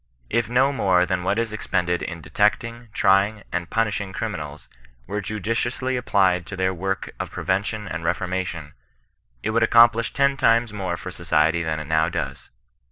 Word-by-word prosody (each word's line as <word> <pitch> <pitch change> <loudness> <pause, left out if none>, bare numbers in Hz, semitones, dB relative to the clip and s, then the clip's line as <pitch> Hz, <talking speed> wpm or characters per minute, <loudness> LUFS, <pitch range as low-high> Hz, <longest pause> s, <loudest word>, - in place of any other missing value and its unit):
If 115 0 +1
no 130 +3 +3
more 90 -8 +3
than 90 -1 -1
what 100 +3 0
is 115 -1 -1
expended 90 -5 -1
in 85 -2 -5
detecting, 115 +6 0
trying, 100 +1 +2
and 90 -2 -3
punishing 105 -3 -1
criminals, 75 -10 -5 0.4
were 105 +7 -3
judiciously 115 +6 -2
applied 95 -7 +2
to 95 - -6
this 95 0 +1
work 95 +2 -3
of - - -3
prevention 105 +2 -2
and 85 -2 -5
reformation, 90 -3 -2 0.7
it 110 - 0
would 115 +1 +2
ac 115 - +3
complish 115 -1 +5
ten 140 0 +2
times 115 -2 +3
more 95 -4 -3
for 90 - -7
society 85 -1 +1
than 80 -2 -2
it 75 - -6
now 80 +2 +2
does. - - -5
95 Hz, 165 wpm, -23 LUFS, 90-115 Hz, 0.7 s, complish